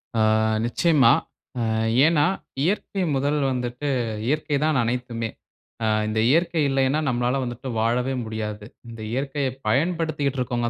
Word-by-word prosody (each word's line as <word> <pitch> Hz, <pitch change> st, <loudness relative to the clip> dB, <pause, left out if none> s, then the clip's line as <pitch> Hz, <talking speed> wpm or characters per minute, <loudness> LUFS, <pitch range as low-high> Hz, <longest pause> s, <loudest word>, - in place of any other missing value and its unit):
ஆ. -, -, +1 dB, 0.5 s
நிச்சயமா. 135 Hz, 0 st, +4 dB, 0.5 s
அ -, -, 0 dB, 0.4 s
ஏன்னா? 155 Hz, -3 st, +4 dB, 0.4 s
இயற்கை 195 Hz, +2 st, -1 dB
1 145 Hz, +2 st, +1 dB
வந்துட்டு 125 Hz, +2 st, -3 dB, 0.4 s
இயற்கை 150 Hz, +1 st, 0 dB
தான் 155 Hz, -3 st, +2 dB
அனைத்துமே. 115 Hz, -1 st, -2 dB, 0.5 s
அ 110 Hz, -, +2 dB, 0.2 s
இந்த 110 Hz, +1 st, -1 dB
இயற்கை 165 Hz, +2 st, +2 dB
இல்லையின்னா, 135 Hz, +2 st, +2 dB
நம்மலாள 125 Hz, 0 st, +1 dB
வந்துட்டு 120 Hz, +1 st, -6 dB
வாழவே 125 Hz, +4 st, +1 dB
முடியாது. 105 Hz, -1 st, -5 dB, 0.2 s
இந்த 115 Hz, -1 st, -9 dB
இயற்கைய 135 Hz, +2 st, -1 dB, 0.2 s
பயன்படுத்திட்டு 150 Hz, 0 st, 0 dB
இருக்கவங்க 120 Hz, -1 st, -1 dB
130 Hz, 125 wpm, -24 LUFS, 120-150 Hz, 0.5 s, நிச்சயமா